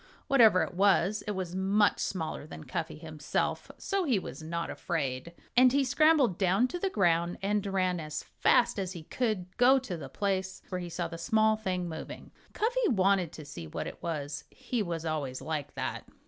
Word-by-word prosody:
Whatever 230 -9 +6
it - - -5
was, 200 +1 +3
it 210 - -1
was 185 -2 -4
much 195 +3 +2
smaller 160 -4 -3
than 155 - -9
Cuffy 155 +3 -4
himself, 155 -2 -3
so 395 -1 -1
he 265 - +2
was 185 - -6
not 170 +1 -3
afraid. 140 -2 -3 0.2
And 255 0 +7
he 280 +1 +3
scrambled 275 - +3
down 195 +6 +3
to 355 - -4
the 390 - 0
ground 170 - +2
and 205 0 +1
ran 185 -2 0
as 155 -1 -5
fast 235 -4 +2
as 190 -1 -3
he 170 -4 -8
could 190 -3 -2
go 255 +2 +6
to 245 -10 -4
the 140 -4 -8
place 190 +4 -2
where 185 -1 -3
he 175 - -6
saw 170 0 -3
the 165 0 -8
small 220 +4 +3
thing 185 -4 -2
moving. 160 -1 -8 0.2
Cuffy 475 +2 +1
wanted 190 - +2
to 155 - -9
see 85 - -8
what - - -4
it - - -8
was. 145 -3 -4
He 245 -2 -3
was 170 -4 -3
always 145 -5 -2
like 150 0 -4
that. - - -3
185 Hz, 190 wpm, -30 LUFS, 165-215 Hz, 0.2 s, And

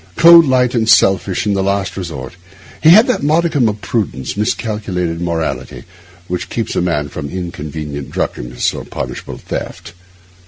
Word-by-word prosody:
Cold, 170 -1 +8
light, 125 -2 +2
and 115 -2 +1
selfish 95 -2 +3
in 105 - +1
the 100 - 0
last 100 0 -1
resort, 80 -9 -6 0.5
he 160 - +6
had 215 +7 +8
that 250 - 0
modicum 150 -5 +2
of 105 0 -5
prudence, 95 - -3
miscalled 105 +1 -2 0.3
morality, 85 -2 -3 0.4
which 90 0 -4
keeps 115 -2 -3
a - - +1
man 80 -5 -1
from 70 0 -6
inconvenient 75 -5 -6
drunkenness - - -2
or - - -6
punishable - - -6
theft. - - -6
100 Hz, 150 wpm, -16 LUFS, 80-120 Hz, 0.5 s, Cold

